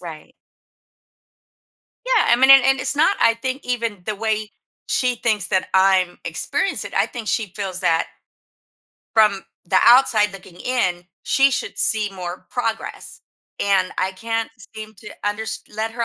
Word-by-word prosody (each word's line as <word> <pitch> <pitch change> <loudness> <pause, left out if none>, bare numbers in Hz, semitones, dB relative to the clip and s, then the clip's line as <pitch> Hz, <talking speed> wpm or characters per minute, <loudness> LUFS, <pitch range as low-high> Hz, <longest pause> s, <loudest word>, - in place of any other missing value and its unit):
Right. 165 +6 -10 1.7
Yeah, - - +3
I - - +6
mean, 265 +2 +5
and 270 -2 +9
and 270 -1 +3
it's - - -2
not, 320 +7 +3
I 230 - +4
think, 260 +4 -5
even 230 -6 -3
the 215 - -3
way 215 0 -2 0.4
she 250 -1 +1
thinks 215 -5 -1
that 185 0 0
I'm 190 -2 +3
experience - - -2
it, - - -8
I - - +2
think 235 -4 -8
she 210 -4 -1
feels 190 -3 -4
that 165 -3 +1 1.1
from 210 -3 +4 0.2
the 185 +1 +2
outside 235 -4 +5
looking 190 -2 -13
in, 185 -9 -1 0.2
she 275 0 +3
should 255 - -4
see 215 -2 0
more 180 -1 -7
progress. 225 -2 -4 0.4
And 195 -2 +2
I 190 +1 0
can't 225 +3 -3 0.2
seem 220 0 -9
to 210 - -11 0.2
unders 210 +2 -3
let 220 +1 -3
her 235 0 -2
215 Hz, 155 wpm, -21 LUFS, 190-240 Hz, 1.7 s, and